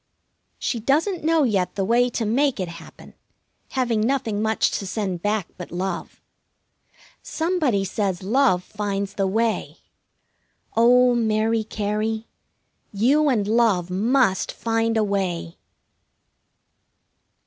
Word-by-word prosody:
She 235 - -2
doesn't 310 - 0
know 320 -1 +3
yet 200 -8 0
the 195 -1 -1
way 240 +4 +3
to 235 -1 -2
make 260 +3 +1
it 185 - -2
happen, 170 -1 -12 0.6
having 240 -5 0
nothing 225 -3 0
much 220 0 +1
to 195 - -6
send 190 -3 -3
back 205 -2 -1
but 180 - -8
love. 180 +1 -5 1.0
Somebody 315 - 0
says 190 -2 -2
love 210 -4 +2
finds 200 -1 -3
the 195 -1 0
way. 225 +3 -1 1.0
Oh, 245 +2 +5
Mary 220 -1 +1
Cary, 215 +1 -2 0.7
you 275 +9 +3
and 215 -6 +1
Love 210 -6 +2
must 225 +1 +2
find 225 0 -1
a 220 - +3
way! 185 -4 -2
220 Hz, 115 wpm, -23 LUFS, 195-245 Hz, 1.0 s, Oh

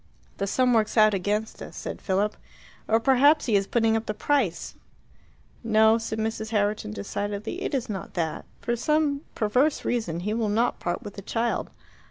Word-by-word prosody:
"The 200 - -2
sum 250 +4 +2
works 220 0 +1
out 215 -1 +6
against 205 +3 -2
us," - - -9
said - - -6
Philip. 200 +2 0 0.5
"Or 225 +1 +3
perhaps 275 +5 +4
he 225 - +2
is 195 -1 +2
putting 225 -2 +2
up 225 0 -2
the 215 - -2
price." 210 - 0 0.9
"No," 220 0 +4
said 225 -1 -4
Mrs. 220 0 -2
Herriton 205 - 0
decidedly. 205 - -4
"It - - -2
is 255 - -1
not 200 -3 -6
that. 165 -3 -2 0.2
For 235 - -1
some 295 +2 +1
perverse 250 +8 +1
reason 195 -9 -1
he 210 +4 -2
will 225 -1 0
not 230 +4 +1
part 175 0 -3
with 205 -1 -9
the - - -5
child. 230 +4 -1
220 Hz, 180 wpm, -26 LUFS, 205-240 Hz, 0.9 s, out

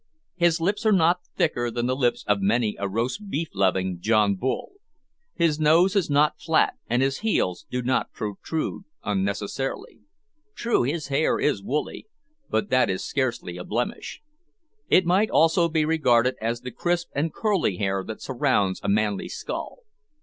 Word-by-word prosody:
His 170 -1 +2
lips 200 +7 0
are - - +5
not 180 -2 +3
thicker 120 -7 0
than 120 +1 -2
the 130 +1 0
lips 125 -3 0
of 105 -1 +2
many 105 +2 +1
a 100 0 -2
roast 125 - -3
beef 160 -1 -2
loving 95 -2 0
John 105 0 +3
Bull. 125 +7 -3 0.6
His 165 -3 +1
nose 165 +5 +4
is 195 -6 +1
not 150 +1 +2
flat, 160 +1 +2 0.2
and 120 +3 +2
his 135 0 0
heels 95 - -1
do 125 0 -2
not 125 +1 0
protrude 125 - -4 0.2
unnecessarily. 100 +6 -3 0.6
True, 235 0 +1
his 145 +3 -2
hair 140 +3 +1
is 145 -9 +1
woolly, 150 - -3 0.4
but 205 - -1
that 130 - +3
is 95 - -2
scarcely 125 -10 -2
a 90 - -6
blemish. 120 - -4 0.7
It 185 - +5
might 190 +5 +3
almost 165 +1 +3
be 155 -1 +2
regarded 130 -6 +3
as 115 +2 -2
the 125 - -6
crisp 175 +3 -1
and 155 +3 -1
curly 195 - 0
hair 95 -1 -1
that 110 - -8
surrounds 125 -8 +1
a - - -2
manly 105 -1 0
skull. - - -6
130 Hz, 165 wpm, -25 LUFS, 105-165 Hz, 0.7 s, are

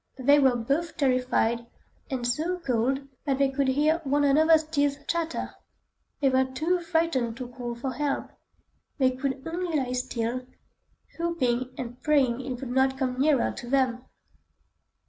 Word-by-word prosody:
They 285 +3 +5
were 265 -3 +4
both 280 +8 -1
terrified, 250 -3 +1 0.4
and 255 -3 -3
so 315 +9 0
cold 270 -2 -1 0.2
that 275 -2 +1
they 275 0 +3
could 275 0 0
hear 300 +5 +2
one 290 +1 +1
another's 315 +3 +5
teeth 290 -2 -1
chatter. 335 -1 -2 0.7
They 275 - +3
were 260 0 +3
too 315 +8 0
frightened 320 -9 0
to 250 -2 -6
call 245 -1 -6
for 255 +3 -3
help; 285 +2 -2 0.7
they 260 -3 +3
could 265 +1 -3
only 340 -1 -1
lie 255 -3 -1
still, 250 0 -2 0.7
hoping 255 -7 -1
and 245 0 -7
praying 265 -5 +2
it 250 -2 -5
would 260 -2 -5
not 265 +1 +2
come 255 -1 -2
nearer 285 -4 +3
to 240 -2 -8
them. 255 -2 +1
265 Hz, 150 wpm, -27 LUFS, 250-295 Hz, 0.7 s, They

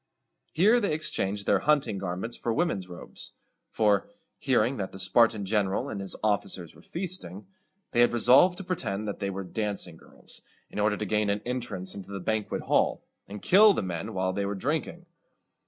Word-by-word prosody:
Here 215 +9 +4
they 205 -8 0
exchanged 100 -10 -2
their 100 - +3
hunting 145 -6 +1
garments 95 +5 -4
for 120 - -2
women's 115 - 0
robes; 90 - -11 0.4
for, 105 - +2 0.3
hearing 130 -1 +1
that 95 -3 -4
the - - -9
Spartan 105 +2 +3
general 105 +5 0
and 100 -5 -4
his 95 - -3
officers 100 -5 -1
were - - -17
feasting, 165 - -4 0.5
they 120 - +3
had 120 - +5
resolved 130 +10 +5
to 195 - -5
pretend 110 - -3
that 100 - -4
they 100 -1 -2
were 95 0 -4
dancing 100 -3 -2
girls, - - -15 0.3
in - - -5
order 105 0 +2
to 105 - -3
gain 105 0 0
an 100 +1 -1
entrance 120 -7 -4
into 100 -1 -9
the 100 -1 -5
banquet 110 +3 -2
hall, - - +1 0.2
and 100 0 -9
kill 205 +3 +7
the - - -1
men 95 +4 -4
while 95 0 0
they 100 - -1
were 100 - -2
drinking. 155 - -3
105 Hz, 185 wpm, -27 LUFS, 95-130 Hz, 0.5 s, kill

